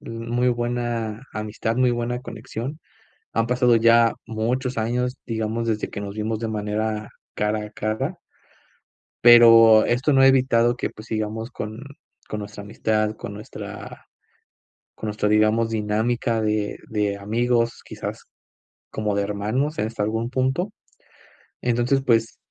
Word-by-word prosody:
l - - -10 0.2
muy 120 +1 +2
buena 120 -2 -2
amistad, 110 +2 -3
muy 125 -1 +3
buena 120 +1 -2
conexión. 130 +4 -6 0.6
Han 115 0 +2
pasado 125 -1 +3
ya 115 0 +5
muchos 120 +3 -2
años, 125 +3 -1
digamos, 115 0 -2
desde 110 -1 -1
que - - -6
nos 100 0 -6
vimos 110 0 -2
de 115 -1 -3
manera 105 0 -2 0.2
cara 105 +1 -1
a 105 - -12
cara. 110 0 -3 1.1
Pero 115 -2 +8
esto 130 +5 +1
no 135 - +4
ha 135 - +7
evitado 125 -2 +3
que, - - -3
pues, 110 +1 -13
sigamos 110 +1 -3
con 110 +3 -6 0.5
con 105 - -4
nuestra 105 0 -8
amistad, 110 +1 -1
con 100 - -7
nuestra 105 - -9 0.9
con 110 - -7
nuestra, 105 0 -1
digamos, 110 +2 +3
dinámica 110 +2 0
de 105 -1 -1
de 105 -2 -1
amigos, 115 +3 0
quizás - - -7 0.7
como 105 -1 -2
de 100 - +1
hermanos 105 +9 -2
en 105 - +1
hasta 110 -2 -4
algún 110 +3 -1
punto. 135 +10 0 0.9
Entonces, 120 +3 +1
pues, 115 -2 +2
115 Hz, 140 wpm, -23 LUFS, 110-120 Hz, 1.1 s, Pero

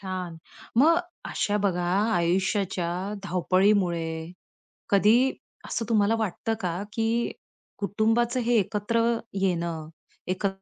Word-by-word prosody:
छान. 185 -3 -5 0.4
मग 330 +5 +6 0.3
अशा 205 0 0
बघा 180 -2 +1 0.3
आयुष्याच्या 180 +1 +1 0.3
धावपळीमुळे 180 -3 +1 0.6
कधी 225 +6 +5 0.3
असं 230 - -2
तुम्हाला 215 0 +3
वाटतं 220 +1 -1
का 180 0 -2
की 225 -1 0 0.7
कुटुंबाचं 225 +5 +1
हे 240 0 +1
एकत्र 210 +3 0 0.4
येणं, 170 -4 -1 0.4
एकत्र 195 +1 -2
195 Hz, 95 wpm, -26 LUFS, 175-220 Hz, 0.7 s, मग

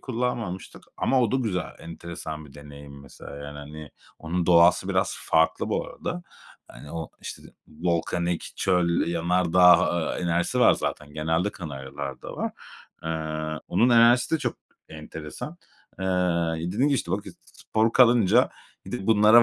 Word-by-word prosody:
kullanmamıştık 120 -7 -4
ama 130 -1 +2
o 120 -1 +1
da - - +3
güzel. 105 -8 -2
Enteresan 80 -2 -7
bir 70 - -17
deneyim 70 -1 -11
mesela, 70 0 -11
yani 75 0 -8
hani, 75 +1 -9 0.3
onun 85 +2 -2
doğası 90 +2 +5
biraz 95 0 +1
farklı 80 0 +2
bu - - -1
arada. 175 0 -5 0.5
Hani, 70 - -12
o, 80 -2 -5
işte, - - -8 0.3
volkanik, 85 +1 -2
çöl, 90 -2 +2
yanardağ, 90 +1 +4 0.2
eee, - - -4
enerjisi 85 0 0
var - - +7
zaten. 75 0 -4
Genelde 80 +6 0
Kanaryalar'da 70 -5 -7
var. - - -2 0.5
Eee, 80 -1 -3
onun 120 - +3
enerjisi 120 +5 +5
de - - +1
çok - - -3 0.3
enteresan. 80 - -8 0.4
Eee, 95 - -4
ya 85 -3 +1 0.2
dedim 130 +8 +2
ki 140 - +2
işte, 105 - -2
"Bak, 100 +2 -1 0.2
spor 110 +1 -1
kalınca 120 -2 +5 0.4
d 95 - -5
bunlara 110 +1 +7
85 Hz, 140 wpm, -25 LUFS, 80-105 Hz, 0.5 s, var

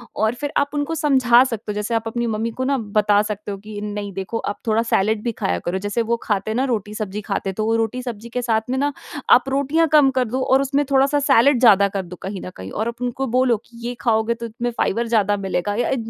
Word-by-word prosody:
और 220 +2 +1
फिर 290 +3 -4
आप 285 0 +2
उनको 295 +3 -1
समझा 260 -5 +4
सकते 225 -4 -4
हो, - - -4
जैसे 210 +3 -3
आप 225 0 -1
अपनी 235 +1 -2
मम्मी 225 +1 -2
को - - +1
ना 275 +1 +1 0.2
बता 205 0 +4
सकते 210 -1 -5
हो 200 - -5
कि 210 +1 -8
नहीं 205 -1 -4
देखो 195 +4 -4
आप 205 - -4
थोड़ा 220 +1 +3
सैलेड 215 -1 +1
भी 235 - 0
खाया 90 - -2
करो, 180 +2 -1
जैसे 205 +3 -1
वो 235 +1 0
खाते 205 0 -1
हैं 220 - -2
ना 255 - +1
रोटी-सब्ज़ी 210 -1 -4
खाते 195 -1 -3
हैं - - -3
तो 220 +1 0
रोटी-सब्ज़ी 230 0 -3
के 250 +1 -2
साथ 225 -2 +1
में 260 - 0
ना 285 +2 +1 0.4
आप 255 +2 +5
रोटियाँ 280 +4 +2
कम 295 -3 +6
कर 255 -1 +2
दो 250 +3 -2
और 265 +1 +3
उसमें 275 +1 +1
थोड़ा-सा 275 +2 +3
सैलेड 275 -1 +4
ज़्यादा 200 -5 +6
कर 195 - 0
दो 180 0 -10
कहीं 195 0 -5
न - - -5
कहीं, 95 +1 -8
और 220 +2 -2
आप 235 +1 -6
उनको 250 +2 -2
बोलो 250 0 +3
कि 235 - -17
ये 245 - -3
खाओगे 225 -1 +2
तो 235 0 -7
उसमें 235 +2 -3
फाइबर 235 +3 0
ज़्यादा 205 -3 +2
मिलेगा 195 0 -2
या 240 - 0
अ - - -1
अ, - - +2
230 Hz, 255 wpm, -21 LUFS, 210-255 Hz, 0.4 s, कम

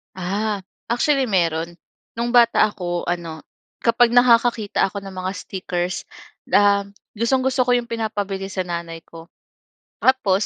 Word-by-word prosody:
Ah, 200 +2 -2 0.3
actually 265 +3 +1
meron. 170 -3 0 0.4
No'ng 235 +1 -2
bata 235 -3 +5
ako 175 -3 -4
ano, 165 -3 -4 0.4
kapag 235 0 +4
nakakakita 235 -4 +3
ako 200 +1 -7
ng 195 -1 -9
mga 185 0 -3
stickers, 180 -2 -4 0.4
uhm, 200 0 +3 0.2
gustong-gusto 260 +2 +1
ko - - +3
'yong 240 -1 -2
pinapabili 205 -4 -3
sa 190 -1 -3
nanay 170 -2 -5
ko. 165 0 -13 0.7
Tapos, 215 -7 +2
200 Hz, 125 wpm, -21 LUFS, 180-235 Hz, 0.7 s, bata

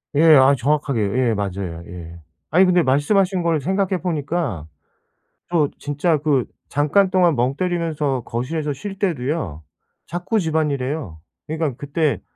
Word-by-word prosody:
예. 150 - +4
아 135 +1 +6
정확하게 140 -1 0
예 115 +4 +1
맞아요 95 -4 -4
예. 85 -1 -9 0.3
아니 185 +4 +5
근데 180 -1 +4
말씀하신 180 +7 +2
거를 165 -3 +1
생각해 190 +3 0
보니까 150 - -2 0.8
또 160 -5 +2
진짜 150 +3 0
그 145 -4 +1 0.2
잠깐 150 +7 +2
동안 180 -4 +3
멍 125 +2 0
때리면서 160 -6 -1
거실에서 145 +6 -3
쉴 195 +8 -7
때도요. 140 - -2 0.4
자꾸 175 +6 -1
집안일 155 -6 0
해요. 130 - -4 0.3
그러니까 155 -4 -2
그때 145 +1 -1
150 Hz, 295 characters per minute, -21 LUFS, 130-170 Hz, 0.8 s, 아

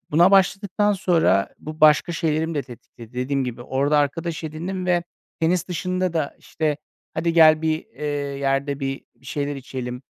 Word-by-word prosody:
buna 170 +5 +5
başladıktan 200 +1 +3
sonra 165 - +2
bu 155 +1 -9
başka 155 +3 +5
şeylerimi 160 0 -1
de 145 - -1
tetikledi. 120 -1 -13
Dediğim 130 +2 -1
gibi 120 -1 -5
orada 140 +4 +1
arkadaş 160 +3 -1
edindim 180 +4 -4
ve 175 -1 +2 0.4
tenis 170 +2 +1
dışında 185 0 -1
da, 155 -4 -1
işte, 155 -2 -2 0.4
"Hadi 170 0 0
gel, 160 -1 +6
bir, 155 0 +1
eee, 150 - -7 0.3
yerde 140 +1 -1
bir 135 0 -3
bir 130 - -21
şeyler 145 0 -3
içelim." 125 -2 -6
155 Hz, 160 wpm, -23 LUFS, 135-170 Hz, 0.4 s, gel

